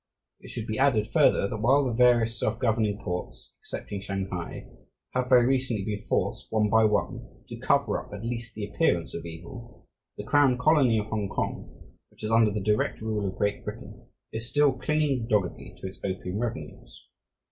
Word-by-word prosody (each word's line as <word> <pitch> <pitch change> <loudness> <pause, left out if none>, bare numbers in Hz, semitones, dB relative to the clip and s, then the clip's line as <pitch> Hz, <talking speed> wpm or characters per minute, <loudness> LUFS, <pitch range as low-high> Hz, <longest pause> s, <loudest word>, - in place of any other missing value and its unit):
It - - -13
should 110 - -4
be 110 0 -3
added, 130 -6 +3
further, 100 - +3
that 110 - -4
while 135 +5 +4
the 125 - -1
various 120 -1 +4
self 110 +1 0
governing 110 -4 +1
ports, 90 -3 -6
excepting 100 -1 -6
Shanghai, 95 -3 -4 0.5
have 125 0 -1
very 125 -2 +6
recently 125 -6 0
been 105 -1 -2
forced, - - -1
one 105 -2 +1
by 110 0 +5
one, 105 -1 -2
to - - -6
cover - - +1
up - - -18
at 105 +2 -7
least 115 -1 -4
the 105 -1 -3
appearance 95 - 0
of 85 0 -6
evil, 120 +9 -11 0.3
the - - -5
crown 145 -4 +4
colony 130 -4 +4
of 105 - -1
Hongkong, 105 -3 -4 0.2
which - - -16
is 110 - -2
under 115 -1 +5
the 105 0 -3
direct 105 +1 +1
rule 110 -2 -2
of 95 +1 -5
Great 105 0 -1
Britain, - - -9 0.2
is 115 +2 -5
still 145 -2 +4
clinging 135 -2 0
doggedly 105 -6 -1
to - - -10
its 95 +1 -7
opium 95 +1 -3
revenues. 75 - -6
110 Hz, 180 wpm, -27 LUFS, 100-125 Hz, 0.5 s, very